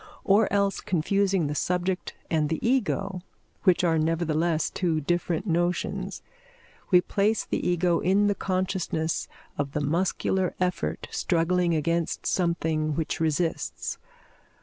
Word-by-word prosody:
Or 200 +1 +4
else, 200 -1 +1
confusing 190 +1 +1
the 145 - -2
subject 180 +4 -1 0.2
and 155 -2 +2
the 160 - 0
Ego, 195 - 0 0.4
which 180 -2 +4
are 165 -2 +3
nevertheless 165 0 +1
two 170 -4 0
different 175 +3 -1
notions, 175 -1 -1 0.7
we 180 -2 +6
place 205 +4 +1
the - - -2
Ego 175 -1 +2
in 195 +3 +3
the 205 - +3
consciousness 185 -4 -1 0.3
of 140 -1 -2
the - - 0
muscular 180 +4 0
effort 180 -1 -1
struggling 175 0 +1
against 165 +2 -1
something 160 -4 0
which 160 -1 -2
resists. 160 +1 -1
175 Hz, 125 wpm, -26 LUFS, 160-185 Hz, 0.7 s, we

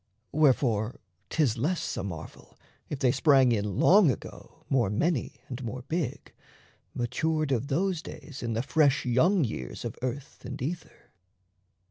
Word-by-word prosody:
Wherefore 125 -7 +2 0.3
'tis 130 -8 +1
less 165 +8 -1
a - - -3
marvel, 85 -5 -8 0.3
if 145 - -3
they 130 -2 +3
sprang 135 -2 +5
In 105 -4 -1
Long 195 -3 +6
Ago 125 - -7
more 125 -7 +2
many, 140 - -1
and 130 0 -6
more 125 +2 -5
big, 140 -3 -3 0.6
Matured 155 +5 0
of 130 +1 0
those 175 +3 0
days 145 -4 -9
in 115 -1 -2
the 115 +2 -1
fresh 145 -1 +3
young 160 +10 +3
years 65 - -5
Of - - -4
earth 130 +3 -5
and 130 +2 -6
ether. 165 +7 -6
135 Hz, 145 wpm, -28 LUFS, 120-155 Hz, 0.6 s, Long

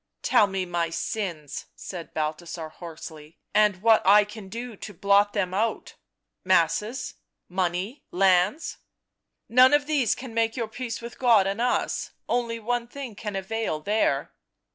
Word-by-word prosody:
" - - -57
Tell 345 - +5
me 190 -1 -2
my 170 -1 -1
sins," 165 -3 -4
said 175 -3 -8
Balthasar 160 +1 -4
hoarsely. 160 -1 -10
" - - -51
And 205 -2 0
what 225 -1 +6
I 205 +2 +7
can 210 -1 -10
do 235 +2 -6
to 205 0 -9
blot 200 +3 +3
them 185 -3 -1
out 220 +4 -1 0.3
— - - -57
masses, 185 - +1 0.3
money, 185 +7 -2
lands 190 - +2 0.2
" - - -58
" 230 - -20
Hone 255 +3 +8
of 290 0 +1
these 280 -8 +2
can 255 -3 -8
make 225 +1 0
your 230 -2 -1
peace 235 +1 -5
with 235 0 -9
God 230 -6 +5
and 200 +4 -1
us 245 - 0
— - - -53
one 240 -1 0 0.4
thing 275 +1 -7
only - - -16
can 210 0 -5
avail 195 -3 -2
there." 210 +7 0
205 Hz, 170 wpm, -26 LUFS, 180-230 Hz, 0.4 s, Hone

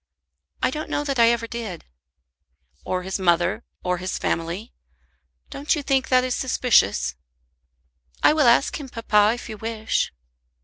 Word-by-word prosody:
"I - - +3
don't 305 +3 -5
know 290 - -1
that 275 -3 -2
I 230 0 +7
ever 235 -1 0
did." 225 -7 -6 1.0
"Or 185 0 -2
his 190 +1 -3
mother, 185 +5 +1 0.2
or 180 -1 -1
his 185 +1 -3
family? 170 +7 -3 0.8
Don't 285 +3 0
you 295 - -4
think 270 -2 +1
that 255 -1 +4
is 255 -1 -1
suspicious?" 100 - +2 1.1
"I - - +6
will 300 -5 +3
ask 235 +6 +3
him, 275 -3 -8
papa, 215 -2 +3
if 245 - -9
you 220 -2 -7
wish." 225 0 -1
230 Hz, 150 wpm, -23 LUFS, 185-255 Hz, 1.1 s, I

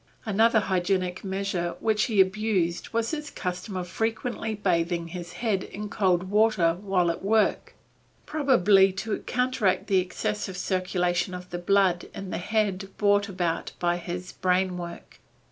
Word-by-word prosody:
Another 220 +1 +3
hygienic 185 -1 -1
measure 190 -3 -2
which 215 -1 +2
he 215 -5 0
abused 190 -3 +1
was 230 0 -1
his 300 -2 -4
custom 180 +2 -4
of 180 -1 -4
frequently 225 +2 -2
bathing 170 -3 0
his 175 0 -7
head 200 -1 -1
in 210 +1 -7
cold 185 -4 +2
water 200 -4 +3
while 185 -4 +2
at 170 - -7
work, 215 +2 +1 0.5
probably 210 - +4
to 210 +3 -2
counteract 250 -6 +1
the 190 -2 +3
excessive 190 +1 -3
circulation 180 -1 0
of 180 0 -9
the 175 - -3
blood 185 -1 +2
in 195 -1 -6
the - - -2
head 195 -1 -1
brought 205 0 +3
about 175 -3 -2
by 175 0 +1
his 175 +1 -6
brain 185 0 +1
work. 175 -1 -8
190 Hz, 145 wpm, -26 LUFS, 180-210 Hz, 0.5 s, probably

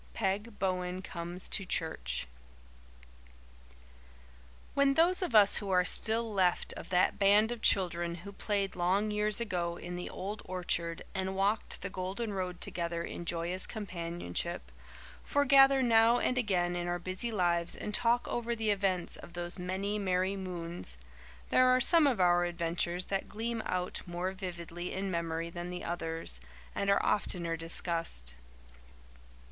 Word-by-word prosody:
PEG 205 +1 -2
BOWEN 185 -1 -2
COMES 175 0 -4
TO 195 - 0
CHURCH 65 - -2 2.5
When 280 -1 +3
those 350 +4 +3
of 350 -11 -1
us 205 -2 +8
who 200 - -3
are 180 -1 +3
still 225 +3 +3
left 185 -3 +1
of - - -9
that 185 +2 +2
band 205 +3 +5
of 240 -2 -5
children 175 -4 +2
who 200 - -7
played 200 -1 -2
long 190 +4 +1
years 210 0 0
ago 175 -6 -2
in 175 +1 -6
the 180 - -5
old 205 +3 -5
orchard 175 -2 -2
and 190 -1 -2
walked 200 +3 0
the 200 - -3
golden 195 +5 -3
road 180 -2 -4
together 170 -1 -2
in 170 - -6
joyous 175 +2 -1
companionship, 170 - -5 0.5
foregather 275 -1 +5
now 230 0 +5
and 255 - +1
again 180 -7 +1
in 175 0 -2
our 175 0 0
busy 185 +6 -4
lives 175 -4 +1
and 210 - -5
talk 240 +1 +2
over 235 0 -2
the 220 -2 +1
events 190 -3 0
of 170 - -12
those 175 +1 -3
many 195 +3 -2
merry 185 0 0
moons 175 - -5 0.5
there 255 - +5
are 255 0 +5
some 320 +3 +6
of 250 -7 +1
our 175 -1 +4
adventures 175 +1 -1
that 195 -1 -3
gleam 225 +1 -3
out 180 0 -2
more 175 +2 -2
vividly 175 -2 -6
in 190 0 -2
memory 170 -1 -2
than 175 +1 -6
the 180 0 -6
others, 165 - -2 0.3
and 200 - -1
are 200 - +3
oftener 170 -5 0
discussed. 165 - 0
185 Hz, 150 wpm, -31 LUFS, 175-210 Hz, 2.5 s, us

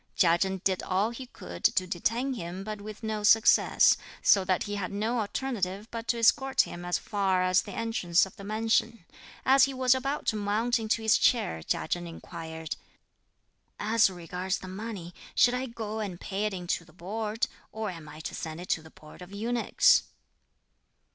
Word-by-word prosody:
Chia 170 -2 +5
Chen 190 0 -1
did 190 -2 +1
all 195 +4 0
he 255 +2 -8
could 85 - -10
to 185 - +3
detain 230 +9 -1
him, 180 -3 -6
but 215 0 -6
with 215 +2 -9
no 215 -1 -2
success; 220 +2 +5 0.3
so 195 - +5
that 185 -1 +1
he 205 - -5
had 200 -3 -3
no 220 +4 -1
alternative 210 -3 -2
but 230 0 -6
to 235 - +1
escort 265 +4 +4
him 175 - -6
as 175 0 0
far 195 -3 0
as 185 0 +4
the 200 - -9
entrance 205 -7 +1
of 190 - -13
the 200 - -11
Mansion. 220 -1 0 0.4
As 270 +1 +6
he 275 -1 -5
was 255 -1 +4
about 275 +3 -2
to - - +1
mount 215 +4 +1
into 220 0 -1
his 220 - +4
chair, 80 - +2
Chia - - -2
Chen 175 0 -2
inquired, 160 -1 -7 1.0
"As 220 0 +4
regards 180 +1 -3
the 185 - -10
money, 190 -3 -6 0.2
shall 245 - +5
I 255 +1 -2
go 220 -2 -5
and 195 -5 -4
pay 200 +2 -2
it 210 - -4
into 175 -1 -2
the 160 -2 -20
Board, 215 +5 -2 0.3
or 220 -2 -3
am 165 -4 -10
I 155 +1 -10
to - - -5
send 160 0 -5
it 180 - -9
to 160 - +1
the 160 - -14
Board 155 +2 -15
of 180 +1 -10
Eunuchs?" 230 +4 +3
205 Hz, 190 wpm, -28 LUFS, 180-225 Hz, 1.0 s, As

